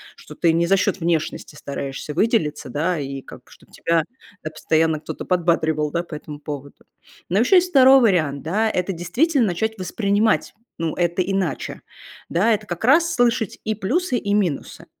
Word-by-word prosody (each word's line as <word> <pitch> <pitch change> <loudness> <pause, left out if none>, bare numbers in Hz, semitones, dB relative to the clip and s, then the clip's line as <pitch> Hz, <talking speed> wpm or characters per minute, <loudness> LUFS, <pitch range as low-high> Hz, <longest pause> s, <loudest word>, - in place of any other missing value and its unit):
что - - -13
ты 170 - +2
не 170 +1 +2
за 195 +3 +3
счёт 195 - 0
внешности 165 -2 -2
стараешься 140 +1 -6
выделиться, 175 - 0
да, 165 +7 -1
и 135 -1 -5
как - - -13
чтоб - - -19
тебя 165 -1 0 0.4
тебя 155 - -5
постоянно 160 0 +1
кто-то - - -7
подбадривал, 160 -4 +1
да, 170 - 0
по 170 -2 -8
этому 150 0 -9
поводу. 145 -1 -8 0.4
Но 180 - +1
ещё 250 - +4
есть 360 0 +3
2 270 -3 +7
вариант, 160 - +2
да, 210 +8 0
это 185 -1 -1
действительно 235 - +1
начать 220 0 -1
воспринимать, 205 +3 0 0.2
ну, 165 -1 -2
это 175 +1 0
иначе, 185 -5 -2 0.5
да. 210 +7 +2
Это 215 0 -3
как 175 +4 -4
раз- 335 +6 +4
слышать 240 - +1
и 215 0 -1
плюсы, 255 - -1
и 200 -3 -2
минусы, 185 -8 -2
180 Hz, 170 wpm, -21 LUFS, 155-220 Hz, 0.5 s, 2